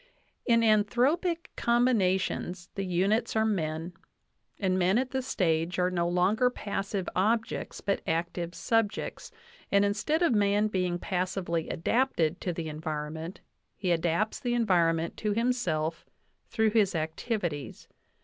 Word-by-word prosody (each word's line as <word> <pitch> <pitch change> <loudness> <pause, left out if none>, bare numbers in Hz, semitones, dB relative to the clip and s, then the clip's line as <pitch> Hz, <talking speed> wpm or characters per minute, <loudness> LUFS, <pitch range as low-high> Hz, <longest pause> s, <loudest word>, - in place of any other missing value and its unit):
"In 230 -1 +5
anthropic 250 - +2
combina 235 -6 +3
tions 180 -1 -4
the 195 -1 -3
units 195 +7 +1
are 220 0 +3
men, 165 -4 -2 0.6
and 185 -2 +1
men 185 +4 +3
at 255 +1 -1
this 265 -1 -2
stage 165 -1 0
are 180 0 +2
no 170 -1 0
longer 190 +8 +3
passive 200 -4 -3
objects, 220 +4 0
but 200 -1 0
active 170 +1 -2
subjects, 225 -2 -1 0.4
and 200 0 +4
instead 260 +12 0
of 330 - +3
man 205 0 +2
being 180 -3 0
passively 180 -3 -2
adapted 175 -5 0
to 180 - -1
the 165 -1 -4
environment, 155 +2 -5 0.3
he 185 -3 -1
adapts 170 +5 0
the 240 -1 -1
environ 180 -8 +3
ment 165 +1 -4
to 210 -1 -1
himself 220 -10 0 0.5
through 220 -2 +2
his 205 -4 +2
activities. 160 - -3
190 Hz, 135 wpm, -29 LUFS, 170-220 Hz, 0.6 s, In